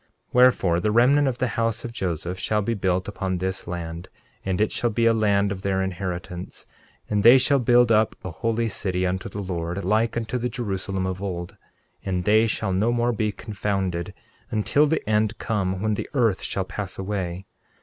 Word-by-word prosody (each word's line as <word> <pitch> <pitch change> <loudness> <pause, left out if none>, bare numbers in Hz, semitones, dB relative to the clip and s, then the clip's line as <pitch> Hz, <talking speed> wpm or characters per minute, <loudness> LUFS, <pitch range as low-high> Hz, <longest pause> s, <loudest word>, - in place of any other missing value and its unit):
13:8 - - -40 0.3
Wherefore, 120 -9 +4
the 105 +4 0
remnant 135 +6 +4
of 125 -2 -1
the 125 0 0
house 115 0 -1
of 120 - -5
Joseph 90 -3 -3
shall 105 +2 0
be 115 - 0
built 95 -3 0
upon 95 -2 -2
this 95 +1 -3
land; 85 0 -6 0.3
and 95 -2 -1
it 110 - +2
shall 120 - 0
be 115 +2 0
a 115 - +5
land 100 -2 +2
of 95 -1 -4
their 95 -1 0
inheritance; 90 -1 -5 0.4
and 105 -1 +1
they 120 +5 +8
shall 140 +2 +3
build 120 -1 +4
up 110 0 +3
a 95 - -5
holy 115 +6 -1
city 95 -3 -1
unto 95 +5 -2
the 100 +1 -5
Lord, 90 0 -3
like 110 +4 +1
unto 120 +2 -2
the 125 +1 -1
Jerusalem 95 -5 -3
of 95 0 -3
old; 90 -3 -5 0.5
and 90 -2 -2
they 110 +2 +4
shall 110 -3 -1
no 105 +6 +2
more 120 0 +1
be 105 -1 0
confounded, 95 -5 -3 0.3
until 130 +7 +2
the 160 -5 -1
end 110 0 +1
come 95 -3 -2
when 110 0 +1
the - - -4
earth 115 -7 +2
shall 95 - -2
pass 95 0 -5
away. 95 -2 -3
100 Hz, 195 wpm, -24 LUFS, 95-115 Hz, 0.5 s, they